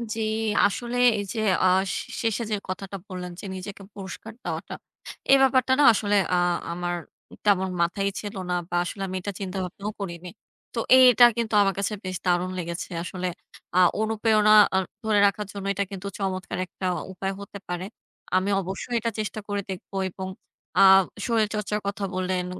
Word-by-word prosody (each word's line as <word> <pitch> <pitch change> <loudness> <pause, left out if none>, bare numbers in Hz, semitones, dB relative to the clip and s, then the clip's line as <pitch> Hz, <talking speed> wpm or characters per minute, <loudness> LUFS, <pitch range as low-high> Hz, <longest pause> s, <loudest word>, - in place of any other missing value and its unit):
জি, 225 - -3 0.4
আসলে 240 +4 -1 0.2
এই 205 - -2
যে 230 - -3 0.3
আ - - +6 0.3
শে - - -4
শেষে 225 0 0
যে - - +2
কথাটা 195 +1 -5
বললেন 180 -2 -6
যে - - -8
নিজেকে 195 +2 -8
পুরস্কার 200 +3 -8
দেওয়াটা। - - -4 0.6
এ - - +9
ব্যাপারটা 260 -1 +4
না - - +6
আসলে 205 -1 +1 0.2
আ - - +4 0.4
আমার 175 0 -2 0.5
তেমন 190 -2 +3
মাথায় 195 +4 +1
ছিল 205 -2 -6
না - - +1 0.2
বা 175 - -3
আসলে 195 +3 -6
আমি 185 - -5
এটা 205 - -3
চিন্তাভাবনাও 190 +1 -4
করিনি। 180 -2 -6 0.4
তো 235 - -2 0.2
এ - - +8
এটা 240 +1 +7
কিন্তু 230 -2 -1
আমার 195 -1 +3
কাছে 200 +2 -1
বেশ 185 -1 -3
দারুণ 180 0 +1
লেগেছে। 170 0 -5
আসলে 185 0 -4 0.5
আ - - +5 0.2
অনুপ্রেরণা 220 -1 +3 0.2
অ - - +4 0.3
ধরে 215 -2 +3
রাখার 210 +1 -2
জন্য 200 -1 -6
এটা 200 - 0
কিন্তু 195 0 -6
চমৎকার 185 -2 -3
একটা 185 +1 -8 0.3
উপায় 195 +1 -3
হতে 200 0 -8
পারে। 180 +1 -3 0.5
আমি 185 +2 +2
অবশ্যই 190 +6 -4
এটা 230 +1 -1
চেষ্টা 215 0 -3
করে 205 0 -1
দেখব 190 -1 -7 0.2
এবং 190 +1 -6 0.5
আ - - +7 0.4
শরীরচর্চার 210 -2 0
কথা 200 0 -3
বললেন, 185 -1 -1
200 Hz, 170 wpm, -25 LUFS, 185-215 Hz, 0.6 s, এ